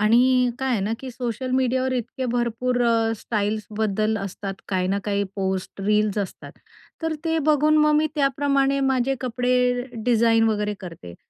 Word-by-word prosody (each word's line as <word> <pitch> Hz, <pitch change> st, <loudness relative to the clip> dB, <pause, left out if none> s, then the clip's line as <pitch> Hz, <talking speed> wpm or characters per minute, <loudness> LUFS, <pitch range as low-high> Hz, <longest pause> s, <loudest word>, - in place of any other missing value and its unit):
आणि 250 Hz, +3 st, +4 dB
काय 265 Hz, -1 st, -1 dB
आहे 235 Hz, -5 st, +1 dB
ना, 205 Hz, +3 st, -1 dB
की 260 Hz, -1 st, -6 dB
सोशल 245 Hz, +1 st, -4 dB
मीडियावर 260 Hz, 0 st, +1 dB
इतके 255 Hz, +1 st, -3 dB
भरपूर 245 Hz, +1 st, 0 dB
अ, 225 Hz, -1 st, +2 dB
स्टाईल्स 210 Hz, 0 st, -2 dB
बद्दल 215 Hz, 0 st, +1 dB
असतात, 195 Hz, 0 st, -5 dB
काही 185 Hz, -2 st, 0 dB
ना 200 Hz, +1 st, +1 dB
काही 200 Hz, -1 st, 0 dB
पोस्ट, 190 Hz, 0 st, -3 dB
रील्स 210 Hz, +1 st, +1 dB
असतात, 200 Hz, -2 st, -5 dB, 0.5 s
तर 325 Hz, -1 st, -1 dB
ते 325 Hz, 0 st, +1 dB
बघून 305 Hz, +1 st, +4 dB
मग 300 Hz, 0 st, +4 dB
मी 305 Hz, +1 st, +3 dB
त्याप्रमाणे 275 Hz, -1 st, +1 dB
माझे 265 Hz, -1 st, +1 dB
कपडे 250 Hz, 0 st, +1 dB, 0.2 s
डिझाईन 230 Hz, -1 st, +4 dB
वगैरे 210 Hz, -1 st, -1 dB
करते, 165 Hz, -, -9 dB
240 Hz, 160 wpm, -23 LUFS, 210-260 Hz, 0.5 s, आणि